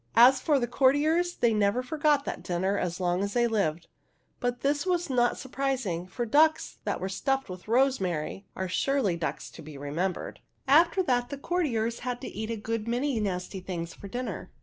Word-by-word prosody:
As 255 Hz, +3 st, +7 dB
for 295 Hz, 0 st, +3 dB
the 240 Hz, -, +1 dB
courtiers, 295 Hz, +8 st, +2 dB
they 235 Hz, -2 st, +2 dB
never 210 Hz, +4 st, +2 dB
forgot 290 Hz, +1 st, +1 dB
that -, -, -4 dB
dinner 185 Hz, +3 st, -1 dB
as 180 Hz, -2 st, -2 dB
long 180 Hz, 0 st, +1 dB
as 200 Hz, 0 st, -2 dB
they 240 Hz, -1 st, +3 dB
lived; 185 Hz, -8 st, 0 dB, 0.5 s
but 245 Hz, -1 st, -2 dB
this 285 Hz, +1 st, +1 dB
was 350 Hz, -4 st, 0 dB
not 240 Hz, -1 st, +3 dB
surpris 270 Hz, -1 st, -2 dB
ing, 175 Hz, -1 st, -3 dB
for 240 Hz, +6 st, -3 dB
ducks 310 Hz, +6 st, +3 dB
that -, -, -1 dB
are 190 Hz, -, -2 dB
stuffed 270 Hz, +7 st, -1 dB
with 180 Hz, +1 st, -9 dB
rosemary 200 Hz, -, 0 dB
are 190 Hz, -, -2 dB
surely 225 Hz, 0 st, +1 dB
ducks 165 Hz, -1 st, -4 dB
to -, -, -11 dB
be 155 Hz, -2 st, -10 dB
remembered. 160 Hz, +7 st, -3 dB, 0.3 s
After 335 Hz, +7 st, +5 dB
that, 245 Hz, -6 st, +1 dB
the 280 Hz, -, -5 dB
courtiers 255 Hz, -9 st, -1 dB
had 245 Hz, -1 st, -3 dB
to -, -, -5 dB
eat 220 Hz, +1 st, -5 dB
a 230 Hz, -, -1 dB
good 225 Hz, +1 st, -3 dB
many 245 Hz, +1 st, 0 dB
nasty 190 Hz, -1 st, -3 dB
things 170 Hz, -2 st, -5 dB
for 200 Hz, -, -10 dB
dinner. 245 Hz, +5 st, -5 dB
235 Hz, 195 wpm, -28 LUFS, 190-275 Hz, 0.5 s, As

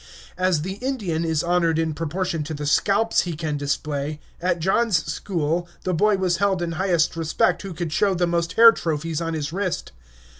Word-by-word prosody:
As 185 Hz, -4 st, +1 dB
the 190 Hz, +3 st, -5 dB
Indian 210 Hz, -12 st, -2 dB
is 160 Hz, -2 st, 0 dB
honored 170 Hz, -2 st, +2 dB
in 160 Hz, -1 st, 0 dB
proportion 165 Hz, +1 st, -2 dB
to 155 Hz, +1 st, -5 dB
the 145 Hz, 0 st, -5 dB
scalps 205 Hz, +9 st, +2 dB
he 175 Hz, -, -4 dB
can 155 Hz, -1 st, -3 dB
display, 145 Hz, +1 st, -2 dB, 0.2 s
at 180 Hz, 0 st, +1 dB
John's 190 Hz, +3 st, +1 dB
school 175 Hz, -2 st, -2 dB, 0.2 s
the 185 Hz, -, -1 dB
boy 205 Hz, +4 st, +3 dB
was 180 Hz, -2 st, +1 dB
held 195 Hz, -3 st, +1 dB
in 170 Hz, -, -2 dB
highest 175 Hz, -2 st, +1 dB
respect 165 Hz, +2 st, +1 dB
who 195 Hz, -4 st, -7 dB
could 165 Hz, -2 st, -3 dB
show 195 Hz, +2 st, +2 dB
the 175 Hz, 0 st, +1 dB
most 170 Hz, -1 st, -1 dB
hair 230 Hz, 0 st, +9 dB
trophies 165 Hz, -3 st, -3 dB
on 165 Hz, -1 st, -2 dB
his 150 Hz, 0 st, -3 dB
wrist. 185 Hz, -1 st, -2 dB
170 Hz, 190 wpm, -23 LUFS, 160-190 Hz, 0.2 s, hair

